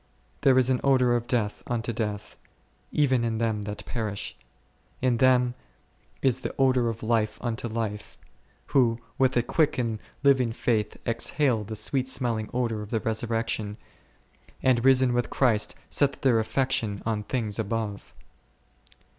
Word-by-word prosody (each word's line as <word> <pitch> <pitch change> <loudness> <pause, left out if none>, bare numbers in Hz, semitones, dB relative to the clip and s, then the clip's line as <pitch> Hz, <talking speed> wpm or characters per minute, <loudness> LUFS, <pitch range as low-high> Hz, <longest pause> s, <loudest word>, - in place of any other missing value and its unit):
There 130 -2 +5
is 130 0 +4
an 125 - +1
odour 130 -3 +4
of 120 0 -2
death 110 -4 -1
unto 120 -1 -2
death, 105 -2 -4 0.6
even 130 -5 +2
in 115 -1 -1
them 110 -2 0
that 105 0 -6
perish; 105 -4 -4 0.6
in 125 -2 +1
them 125 -1 +4 0.7
is 130 -2 +3
the - - -5
odour 130 -3 +3
of 115 0 -6
life 110 -1 +1
unto 120 -1 -3
life, 110 -2 -4 0.6
who 120 -4 +4 0.2
with 130 -1 +3
a 120 - +3
quick 150 +5 +1
and 115 -3 -1 0.2
living 130 -5 +4
faith 110 -3 -1
exhale 115 0 +1
the 110 +1 -6
sweet 130 +5 0
smelling 115 -5 -1
odour 115 -3 -1
of 105 - -8
the 115 - 0
Resurrection, 110 -1 -2 0.9
and, 125 -3 +3
risen 130 -1 +5
with 120 0 0
Christ, 110 -8 +1 0.2
set 140 -1 +1
their 125 -4 +4
affection 110 -3 -1
on 110 -2 -1
things 110 -1 -1
above. 110 -1 -3
115 Hz, 145 wpm, -26 LUFS, 110-130 Hz, 0.9 s, There